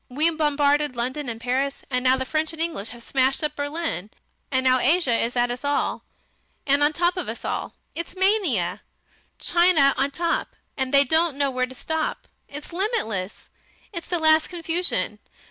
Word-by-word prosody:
We 300 Hz, +6 st, +3 dB
bombarded 295 Hz, -2 st, +1 dB
London 255 Hz, +3 st, -3 dB
and 225 Hz, -1 st, -5 dB
Paris, 260 Hz, +4 st, -1 dB
and 250 Hz, 0 st, 0 dB
now 260 Hz, 0 st, +4 dB
the 260 Hz, -, -3 dB
French 310 Hz, +4 st, -1 dB
and 320 Hz, -, -10 dB
English 325 Hz, -11 st, -2 dB
have 235 Hz, 0 st, -11 dB
smashed 265 Hz, +3 st, +1 dB
up 300 Hz, -, -1 dB
Berlin. 290 Hz, -, -3 dB, 0.4 s
And 260 Hz, -1 st, +2 dB
now 255 Hz, 0 st, +4 dB
Asia 275 Hz, -3 st, +3 dB
is 235 Hz, +2 st, 0 dB
at 240 Hz, 0 st, +2 dB
us 245 Hz, +2 st, -6 dB
all, 285 Hz, 0 st, -1 dB, 0.6 s
and 280 Hz, +1 st, +3 dB
on 295 Hz, -, +6 dB
the -, -, -9 dB
top 350 Hz, +1 st, +2 dB
of 365 Hz, -, -3 dB
us -, -, -6 dB
all.... -, -, -3 dB, 0.2 s
It's 335 Hz, +3 st, -5 dB
mania. 375 Hz, -, +1 dB, 0.6 s
China 345 Hz, -6 st, +4 dB
on 270 Hz, -, +3 dB
the 280 Hz, -, -5 dB
top. 340 Hz, 0 st, -1 dB, 0.2 s
And 265 Hz, -1 st, -2 dB
they 280 Hz, 0 st, +6 dB
don't 315 Hz, +1 st, +1 dB
know 280 Hz, -1 st, +1 dB
where 255 Hz, 0 st, 0 dB
to 260 Hz, -, -11 dB
stop. 320 Hz, +4 st, -3 dB, 0.2 s
It's 295 Hz, +4 st, -8 dB
limitless. 225 Hz, -, -2 dB, 0.5 s
It's 340 Hz, -3 st, -5 dB
the 355 Hz, -, 0 dB
last 315 Hz, -1 st, +4 dB
confusion. 330 Hz, -, -2 dB
285 Hz, 185 wpm, -24 LUFS, 255-330 Hz, 0.6 s, on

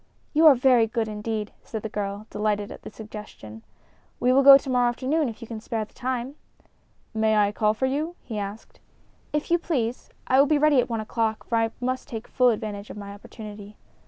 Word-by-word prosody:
"You 315 Hz, +2 st, +6 dB
are 290 Hz, -, +9 dB
very 245 Hz, -2 st, +4 dB
good, 225 Hz, 0 st, -1 dB
indeed," 210 Hz, 0 st, -4 dB
said 220 Hz, -2 st, -6 dB
the -, -, -2 dB
girl, 205 Hz, 0 st, -4 dB
delighted 210 Hz, -1 st, -1 dB
at -, -, -10 dB
the -, -, -9 dB
suggestion. 210 Hz, -, -10 dB, 0.6 s
"We 250 Hz, +1 st, +3 dB
will 270 Hz, -, +5 dB
go 275 Hz, 0 st, +10 dB
to 275 Hz, -, -10 dB
morrow 250 Hz, -2 st, +3 dB
afternoon, 270 Hz, +4 st, 0 dB
if 230 Hz, +1 st, -9 dB
you -, -, -9 dB
can 220 Hz, -1 st, -7 dB
spare 225 Hz, -1 st, -3 dB
the -, -, -28 dB
time." 255 Hz, +2 st, -4 dB, 0.8 s
"May 220 Hz, 0 st, +2 dB
I 205 Hz, -1 st, +3 dB
call 215 Hz, 0 st, +1 dB
for 260 Hz, -, 0 dB
you?" 300 Hz, +6 st, -2 dB
he 220 Hz, -4 st, -5 dB
asked. 205 Hz, +2 st, -7 dB, 0.5 s
"If 300 Hz, +2 st, -2 dB
you 345 Hz, -, +4 dB
please. 250 Hz, -8 st, -2 dB, 0.2 s
I 260 Hz, -, +3 dB
will 280 Hz, -, +6 dB
be 305 Hz, 0 st, +3 dB
ready 295 Hz, -2 st, +4 dB
at 245 Hz, -, 0 dB
one 225 Hz, -2 st, -2 dB
o'clock, 220 Hz, 0 st, -2 dB
for 235 Hz, -, -2 dB
I 225 Hz, 0 st, +1 dB
must 255 Hz, +1 st, -2 dB
take 225 Hz, -1 st, -7 dB
full 250 Hz, -1 st, +3 dB
advantage 215 Hz, -2 st, -3 dB
of -, -, -8 dB
my 200 Hz, -1 st, -7 dB
opportunity." 210 Hz, 0 st, -11 dB
225 Hz, 215 wpm, -25 LUFS, 210-260 Hz, 0.8 s, go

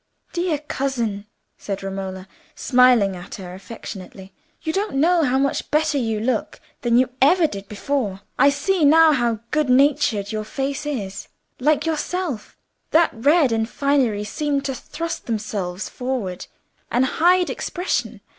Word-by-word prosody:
"Dear 345 Hz, -3 st, 0 dB
cousin," 240 Hz, -8 st, -3 dB, 0.3 s
said 195 Hz, -1 st, -5 dB
Romola, 190 Hz, -1 st, -5 dB, 0.3 s
smiling 245 Hz, -7 st, +4 dB
at 175 Hz, +1 st, -8 dB
her 180 Hz, -2 st, -8 dB
affectionately, 190 Hz, -1 st, -9 dB, 0.3 s
"you 320 Hz, -1 st, -2 dB
don't 405 Hz, -2 st, -1 dB
know 335 Hz, +5 st, +4 dB
how 260 Hz, -2 st, +2 dB
much 275 Hz, 0 st, 0 dB
better 305 Hz, -1 st, +2 dB
you 225 Hz, -3 st, -1 dB
look 245 Hz, +4 st, -2 dB, 0.2 s
than 235 Hz, -1 st, +3 dB
you 255 Hz, 0 st, +3 dB
ever 330 Hz, +5 st, +5 dB
did 200 Hz, -8 st, -4 dB
before. 210 Hz, -3 st, -2 dB, 0.2 s
I 280 Hz, -, +7 dB
see 315 Hz, +5 st, 0 dB
now 320 Hz, +2 st, +7 dB
how 240 Hz, -6 st, 0 dB
good 300 Hz, -3 st, +1 dB
natured 255 Hz, -6 st, +3 dB
your 215 Hz, -1 st, -2 dB
face 275 Hz, +6 st, -3 dB
is, 205 Hz, -10 st, -4 dB, 0.3 s
like 300 Hz, +5 st, +2 dB
yourself. 325 Hz, -, -3 dB, 0.3 s
That 330 Hz, +1 st, +4 dB
red 285 Hz, +4 st, +3 dB
and 225 Hz, 0 st, 0 dB
finery 265 Hz, -8 st, +1 dB
seemed 280 Hz, +5 st, -2 dB
to 270 Hz, -, -1 dB
thrust 330 Hz, +6 st, -6 dB
themselves 205 Hz, -5 st, -3 dB
forward 245 Hz, -8 st, -4 dB, 0.4 s
and 250 Hz, +2 st, +2 dB
hide 355 Hz, +6 st, +3 dB
expression. 360 Hz, +2 st, -3 dB
260 Hz, 145 wpm, -22 LUFS, 210-300 Hz, 0.4 s, I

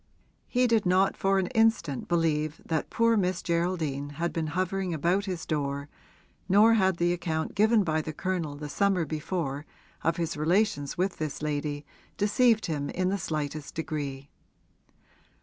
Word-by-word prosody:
He 250 Hz, 0 st, +2 dB
did 225 Hz, -5 st, +2 dB
not 190 Hz, +2 st, +3 dB
for 195 Hz, 0 st, +2 dB
an 190 Hz, -, +2 dB
instant 225 Hz, -, +2 dB
believe 155 Hz, -2 st, 0 dB
that 160 Hz, -2 st, -1 dB
poor 230 Hz, 0 st, +3 dB
Miss 185 Hz, -3 st, 0 dB
Geraldine 165 Hz, -5 st, -1 dB
had 170 Hz, +1 st, -1 dB
been 160 Hz, -1 st, -1 dB
hovering 185 Hz, +1 st, -1 dB
about 175 Hz, +6 st, +1 dB
his 180 Hz, -4 st, -4 dB
door, 140 Hz, -1 st, -2 dB, 0.6 s
nor 210 Hz, +4 st, +6 dB
had 190 Hz, -5 st, +3 dB
the 175 Hz, +1 st, +2 dB
account 160 Hz, -2 st, -2 dB
given 220 Hz, +1 st, +4 dB
by 155 Hz, -3 st, 0 dB
the 155 Hz, -, -5 dB
Colonel 165 Hz, -2 st, -2 dB
the 150 Hz, +1 st, -6 dB
summer 190 Hz, +2 st, +1 dB
before 150 Hz, -2 st, -3 dB, 0.4 s
of 165 Hz, 0 st, +1 dB
his 165 Hz, -1 st, -2 dB
relations 155 Hz, -2 st, +1 dB
with 185 Hz, +1 st, 0 dB
this 155 Hz, -1 st, -4 dB
lady 145 Hz, -1 st, -2 dB, 0.3 s
deceived 220 Hz, +2 st, +3 dB
him 145 Hz, -3 st, -2 dB
in 185 Hz, 0 st, 0 dB
the 200 Hz, +1 st, -1 dB
slightest 155 Hz, -2 st, -4 dB
degree. 145 Hz, -3 st, -4 dB
170 Hz, 155 wpm, -28 LUFS, 150-195 Hz, 0.6 s, nor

